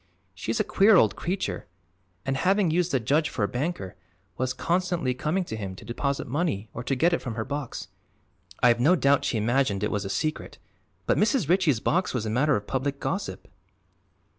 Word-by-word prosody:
"She's 110 +4 -3
a - - +3
queer 205 +2 +5
old - - +4
creature 185 - -3 0.6
and, 135 0 0
having 185 +4 +2
used 175 +1 +1
the 135 - +2
judge 145 +7 +1
for 115 - -2
a - - +2
banker, 125 - -3 0.4
was 130 0 -1
constantly 175 -1 0
coming 155 +9 -1
to 140 - -6
him 100 -3 -5
to - - -12
deposit 140 +4 -2
money 135 - -2
or 115 - -5
to 135 - 0
get 170 +7 +3
it - - 0
from 120 -4 -5
her 110 - -3
box. 145 -3 -5 0.8
I've 120 -1 +5
no 155 +9 +5
doubt 140 -4 +3
she 115 - 0
imagined 110 -2 +1
it 105 - 0
was 105 -1 -1
a 95 - -5
secret, 155 +9 -3 0.5
but - - +2
Mrs. 220 - +2
Ritchie's 170 - +3
box 180 -4 0
was 115 -3 -1
a 110 - -2
matter 140 +6 +3
of 105 - -3
public 140 +3 -2
gossip." - - -4
140 Hz, 195 wpm, -26 LUFS, 115-170 Hz, 0.8 s, queer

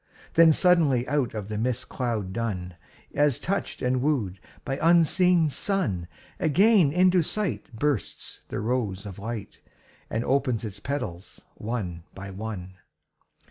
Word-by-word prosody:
Then 165 -1 +7
suddenly 155 -8 +3
out 140 -5 0
of 105 -2 -4
the 105 0 -3
mist 125 +2 -1
cloud 110 -7 -2
dun, 95 -6 -3 0.4
As 145 -4 +3
touched 195 -5 -3
and 125 0 +1
wooed 120 -11 0 0.3
by 135 -1 -2
unseen 170 +1 +4
sun, 135 - -1 0.3
Again 180 0 +4
into 180 +2 +4
sight 190 -2 -2
bursts 135 0 -2
the - - -4
rose 110 -4 -1
of 100 -1 -8
light 110 -1 -6 0.5
And 115 +2 -2
opens 130 -4 +1
its 100 -2 -6
petals 105 -9 -5
one 100 -7 -4
by 100 0 -7
one. 95 -2 -7
125 Hz, 135 wpm, -26 LUFS, 100-155 Hz, 0.5 s, Then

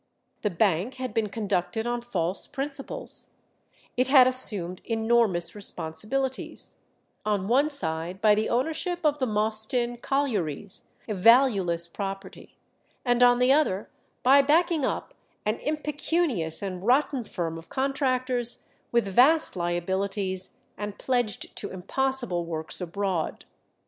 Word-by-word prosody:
The 210 - +1
bank 195 +5 +1
had 255 -4 -5
been 220 -2 0
conducted 200 0 -1
on 240 0 -1
false 185 -6 -2
principles; 280 - -4 0.6
it 255 +1 +2
had 260 -2 +8
assumed 205 -8 +1
enormous 225 -7 +2
responsibilities 215 +8 -3 0.5
on 205 -2 0
one 275 +6 +3
side 170 - -3
by 215 0 +5
the 215 +1 0
ownership 320 +7 -1
of 295 -1 +2
the 260 - +1
Mostyn 220 +3 0
collieries, 205 - -2 0.2
a 215 - -2
valueless 195 -6 +4
property, 195 +2 -7 0.5
and 245 -1 +2
on 245 0 +7
the 250 +1 +4
other 275 -10 +2 0.3
by 270 +2 +7
backing 320 +2 +2
up - - -3 0.3
an 215 +2 0
impecunious 300 - 0
and 185 -2 -4
rotten 260 +2 +2
firm 165 -6 -4
of 165 - -16
contractors 255 -3 -1 0.3
with 235 -3 +2
vast 270 +11 +5
liabilities 190 +2 -1 0.2
and 205 -1 -5
pledged 245 -6 -1
to - - -4
impossible 240 0 -1
works 160 -3 -3
abroad. 180 -1 -2
220 Hz, 125 wpm, -26 LUFS, 185-260 Hz, 0.6 s, had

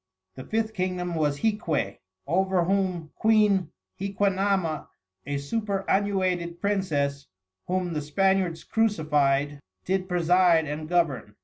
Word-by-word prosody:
The 130 - -9
Fifth 220 +4 -1
Kingdom 180 -2 -2
was 150 -3 0
Hiquey, 165 - -1 0.3
over 185 +3 +2
whom 180 -3 -1
Queen 210 -5 +3 0.3
Hiquanama, 195 -4 0 0.4
a 145 0 -1
superannuated 190 0 -1
Princess, 145 -9 -1 0.4
whome 180 -1 -1
the 150 - -1
Spaniards 185 +2 +1
Crucified, 145 -9 +1 0.3
did 185 0 -1
preside 175 -1 +4
and 155 +1 -5
Govern. 150 -12 0
180 Hz, 105 wpm, -26 LUFS, 155-195 Hz, 0.4 s, preside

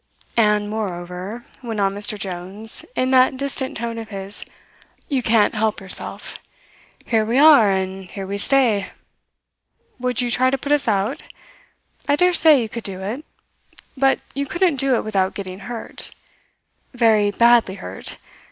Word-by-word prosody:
"And, 210 -2 +2
moreover," 195 +1 -5 0.2
went 225 -4 -5
on 195 -1 +1
Mr. 205 +1 +1
Jones 195 +3 -5
in 255 +1 0
that 260 0 +4
distant 275 0 -1
tone 230 0 -4
of 225 - -8
his, 195 -1 -3 0.7
"you 275 -4 0
can't 225 -3 +3
help 220 -1 -1
yourself. 190 -2 0 0.7
Here 225 -2 +1
we 230 +4 0
are 285 -7 +7
and 190 0 -2
here 195 +1 -7
we 200 +1 -4
stay. 230 -5 +2 1.1
Would 250 0 0
you 245 -1 +2
try 255 +3 +3
to 270 - 0
put 280 +2 -5
us 295 -3 +2
out? 200 -1 0 0.9
I 285 - +3
dare 360 +3 +3
say 315 -4 +6
you - - -4
could 230 +1 -7
do 190 -2 -4
it; 235 +10 -4 0.7
but 270 0 +2
you 280 0 -3
couldn't 345 -1 +1
do 270 -1 +2
it - - -1
without 195 -3 -1
getting 185 -1 -7
hurt 225 +3 -5 0.9
very 220 -4 +3
badly 235 -2 +4
hurt. 95 - -5
220 Hz, 155 wpm, -21 LUFS, 200-255 Hz, 1.1 s, are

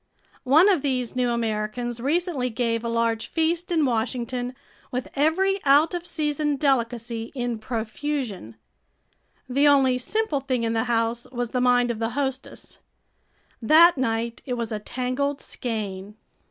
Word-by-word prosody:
One 315 +8 +7
of 375 -8 +3
these 255 -4 -1
new 250 -1 +1
Americans 235 +1 -2
recently 290 -1 0
gave 230 0 -1
a 235 - -2
large 230 -1 0
feast 335 +2 -1
in 320 -3 +3
Washington 245 +1 -2 0.3
with 250 0 -3
every 375 +7 +2
out 290 +5 +5
of 350 0 -4
season 295 -2 -1
delicacy 235 -4 -1
in 245 -3 -2
profusion. 225 - -4 0.9
The 275 +3 +3
only 265 -3 +4
simple 410 - -1
thing 260 -3 -2
in 225 0 0
the 225 0 0
house 230 0 0
was 245 -2 -3
the 250 - 0
mind 245 -1 +3
of 225 - -5
the 230 +1 -2
hostess. 265 -2 -4 0.8
That 325 +8 +7
night 235 -3 -2
it 250 - -4
was 235 -1 -4
a 215 - -2
tangled 255 +5 -2
skein. 210 -4 -5
250 Hz, 145 wpm, -24 LUFS, 230-285 Hz, 0.9 s, One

